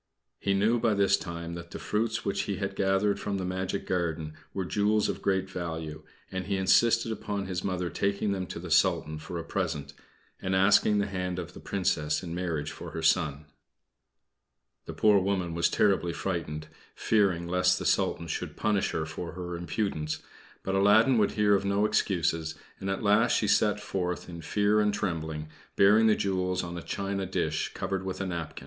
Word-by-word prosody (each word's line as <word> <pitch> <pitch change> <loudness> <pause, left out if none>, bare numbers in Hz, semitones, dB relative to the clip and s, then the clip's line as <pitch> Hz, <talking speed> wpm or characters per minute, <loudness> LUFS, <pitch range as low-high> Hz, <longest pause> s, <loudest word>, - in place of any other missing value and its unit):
He 100 -1 +1
knew 110 +5 +3
by 110 -2 +2
this 100 -1 +4
time 85 -2 -6
that 85 0 -8
the - - -7
fruits 110 +1 -1
which 100 - 0
he 100 - 0
had 100 +1 -3
gathered 95 +1 +2
from 100 -1 -2
the 95 - -3
magic 95 +1 -3
garden 80 -4 -2 0.2
were 95 -2 -3
jewels 105 +3 +2
of - - -3
great 95 -1 +1
value, 80 -4 -5 0.3
and 95 0 -4
he 100 -1 0
insisted 115 +4 +4
upon 100 -2 -3
his 90 -1 -3
Mother 90 -2 -1
taking 100 +1 0
them 95 -2 -2
to - - -6
the 85 0 -7
Sultan 75 +1 +2
for 80 +3 -6
a 85 - -4
present, 85 -5 -3 0.5
and 95 0 0
asking 105 +2 +5
the 100 - +2
hand 90 -2 -3
of 90 -1 -6
the - - -10
Princess 75 -6 -1
in 85 -2 -5
marriage 85 -4 -2
for - - -8
her 80 - -4
son. 80 -2 +2 1.4
The - - -6
poor 105 -2 +5
woman 95 -3 -1
was 85 0 +2
terribly 95 -4 +2
frightened, 80 -4 -3 0.3
fearing 95 -6 +2
lest 90 0 +3
the - - -5
Sultan 85 - +1
should - - -4
punish 105 -2 +1
her 80 - -1
for 80 +2 -6
her 90 0 -5
impudence; 85 -2 -2 0.4
but 95 - -2
Aladdin 110 +6 +5
would 105 - +2
hear 105 -1 +3
of 100 - +2
no 100 +1 +2
excuses, 85 -6 0 0.2
and 95 - -4
at 95 - -2
last 105 +3 +4
she 105 - 0
set 105 +1 +3
forth 90 -3 -3
in 85 -1 -8
fear 105 +5 +2
and 105 -1 +2
trembling, 80 -5 -3 0.3
bearing 105 +3 +6
the 110 - +5
jewels 90 -2 -1
on 85 0 -5
a 85 - -5
china 100 +2 -3
dish - - -1
covered 95 -1 -2
with 95 -1 -4
a 95 - -2
napkin. 85 -4 -4
95 Hz, 190 wpm, -28 LUFS, 85-100 Hz, 1.4 s, bearing